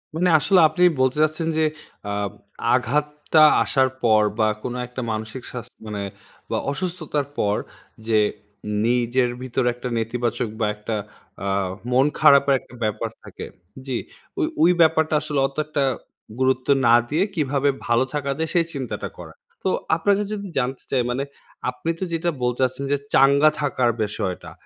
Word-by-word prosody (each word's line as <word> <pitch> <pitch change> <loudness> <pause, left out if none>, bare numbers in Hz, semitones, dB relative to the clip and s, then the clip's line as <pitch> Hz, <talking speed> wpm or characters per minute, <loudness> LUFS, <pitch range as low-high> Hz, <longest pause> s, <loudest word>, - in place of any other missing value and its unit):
মানে 180 +2 +2
আসলে 190 +4 +4
আপনি 180 - 0 0.2
বলতে 130 +2 +2
চাচ্ছেন 155 +1 -1
যে, 160 - +3 0.5
আ - - -2 0.6
আঘাতটা 150 +3 +1 0.2
আসার 130 -1 +2
পর 110 -2 +5 0.2
বা 110 - +4 0.2
কোনো 125 0 -3
একটা 125 +1 -6
মানসিক 110 +3 -5
স্বাস 120 -2 -6 0.2
মানে 105 -1 -4 0.5
বা - - +1
অসুস্থতার 155 -2 -3
পর 105 0 +1 0.5
যে 110 -1 +3 0.7
নিজের 125 +1 +2
ভিতরে 130 0 -1
একটা 125 +1 -6
নেতিবাচক 115 0 -1
বা 110 - +2
একটা 105 +1 -4 0.5
আ - - -3 0.5
মন 130 +2 +4
খারাপের 140 -2 +6
একটা 125 - -17
ব্যাপার 110 +1 -1
থাকে। - - -8 0.4
জি, 130 -3 -1 0.4
ওই, - - +3 0.2
ওই, 170 +3 +6
ব্যাপারটা 160 -1 +3
আসলে 150 -2 -2
অত 135 - -16
একটা 150 -2 -1 0.6
গুরুত্ব 130 0 +1 0.2
না 115 - +6 0.2
দিয়ে 160 +5 +2
কিভাবে 145 -2 +1 0.2
ভালো 120 +2 +3
থাকা 140 -2 -1
যায়, 160 0 -2
সেই 170 - +4
চিন্তাটা 130 -5 -4
করা। - - -10 0.3
তো, - - +1 0.3
আপনার 205 - +2
কাছে 205 0 -3
যদি 200 -1 -6
জানতে 130 +1 -3
চাই 130 - +3
মানে, 130 +3 -1 0.5
আপনি 125 +6 -5
তো - - -2
যেটা 165 +1 0
বলতে 125 0 0
চাইছেন 130 +2 -1
যে, 145 - +3 0.2
চাঙ্গা 140 +3 +6
থাকার 130 -4 +1
বিষয়টা 100 -3 -4
130 Hz, 160 wpm, -23 LUFS, 120-150 Hz, 0.7 s, খারাপের